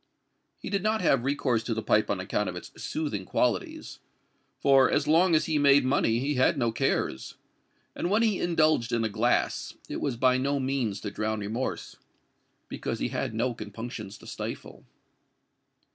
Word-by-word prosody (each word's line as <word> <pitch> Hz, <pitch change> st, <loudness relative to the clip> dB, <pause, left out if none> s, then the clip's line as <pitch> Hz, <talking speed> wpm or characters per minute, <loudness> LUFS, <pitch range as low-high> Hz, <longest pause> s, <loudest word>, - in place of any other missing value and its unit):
He -, -, -7 dB
did 200 Hz, -2 st, 0 dB
not 215 Hz, +2 st, +1 dB
have 135 Hz, -7 st, +3 dB
recourse 130 Hz, -4 st, 0 dB
to 115 Hz, -, -2 dB
the 110 Hz, -, -3 dB
pipe -, -, +2 dB
on -, -, 0 dB
account -, -, -1 dB
of -, -, -6 dB
its -, -, -8 dB
soothing 145 Hz, -11 st, -3 dB
qualities—for 135 Hz, +7 st, -1 dB
as 145 Hz, 0 st, +1 dB
long 165 Hz, +3 st, +4 dB
as 155 Hz, -, +2 dB
he 155 Hz, -2 st, 0 dB
made 140 Hz, -1 st, +5 dB
money, 125 Hz, -3 st, +2 dB
he 140 Hz, +4 st, -1 dB
had 130 Hz, +2 st, +2 dB
no 120 Hz, -3 st, +1 dB
cares; 90 Hz, -10 st, -1 dB, 0.6 s
and 175 Hz, -, -2 dB
when 215 Hz, +4 st, +3 dB
he 215 Hz, -4 st, +1 dB
indulged 155 Hz, -8 st, +2 dB
in 115 Hz, -1 st, +1 dB
a 110 Hz, -, 0 dB
glass, 100 Hz, -, 0 dB
it -, -, -4 dB
was 135 Hz, -5 st, -2 dB
by 130 Hz, +1 st, +3 dB
no 140 Hz, +2 st, 0 dB
means 130 Hz, -7 st, -1 dB
to 105 Hz, -, -4 dB
drown 110 Hz, +1 st, -2 dB
remorse—because 110 Hz, +6 st, -6 dB
he -, -, -2 dB
had 110 Hz, -, -3 dB
no 120 Hz, +2 st, 0 dB
compunctions 105 Hz, -1 st, -7 dB
to -, -, -16 dB
stifle. -, -, -7 dB
130 Hz, 170 wpm, -27 LUFS, 115-150 Hz, 0.6 s, made